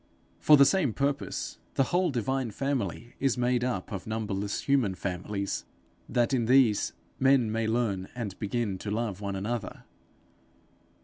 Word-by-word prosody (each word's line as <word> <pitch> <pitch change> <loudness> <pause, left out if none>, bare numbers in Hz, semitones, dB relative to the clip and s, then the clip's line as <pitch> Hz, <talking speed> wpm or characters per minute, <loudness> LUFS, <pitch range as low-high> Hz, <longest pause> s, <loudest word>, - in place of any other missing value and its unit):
For 150 - +7
the 140 - +8
same 160 - +2
purpose, 140 +2 -2 0.2
the 135 - +4
whole 180 0 +3
divine 130 0 -1
family 120 -2 -3
is 135 -2 +1
made 125 0 +1
up 120 -8 -2
of 100 -1 -5
numberless 105 -2 -2
human 130 -9 +2
families, 100 +2 -3 0.5
that 120 +2 +1
in 120 -3 +2
these, 125 -4 +4 0.3
men 130 -4 +4
may 110 0 0
learn 110 -5 0
and 110 -6 -4
begin 105 -2 -2
to 105 - -5
love 105 -2 -2
one 100 -1 -3
another. 105 +2 -4
115 Hz, 145 wpm, -28 LUFS, 100-130 Hz, 0.5 s, the